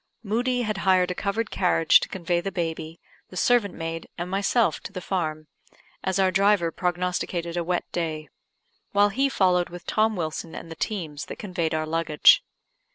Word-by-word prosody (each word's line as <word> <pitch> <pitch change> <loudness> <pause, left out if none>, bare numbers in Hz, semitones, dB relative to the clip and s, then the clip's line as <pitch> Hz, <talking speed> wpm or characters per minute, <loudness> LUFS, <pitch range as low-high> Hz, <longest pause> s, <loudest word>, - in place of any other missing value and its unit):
Moodie 245 +4 0
had 215 -3 -2
hired 185 -1 +3
a - - 0
covered 210 +4 -2
carriage 165 -3 +4
to - - -5
convey 175 -2 -1
the 195 - -4
baby, 165 -2 -4 0.3
the 185 - -9
servant 235 -2 +2
maid, 165 0 -5
and 175 +1 -4
myself 200 +4 +2
to - - -9
the 190 - -5
farm, 155 -4 -3 0.6
as 190 0 0
our 190 -1 +3
driver 195 -2 +3
prognosticated 175 -1 -2
a 175 - 0
wet 175 +1 -1
day; 155 -3 -3 0.7
while 205 0 +5
he 270 +7 +1
followed 180 -7 +2
with 175 0 -10
Tom 220 0 +1
Wilson 160 -1 -4
and 165 - -8
the - - -6
teams 160 -9 -4
that - - -7
conveyed 175 -5 -2
our 155 0 -1
luggage. 160 -1 +4
180 Hz, 175 wpm, -25 LUFS, 165-200 Hz, 0.7 s, while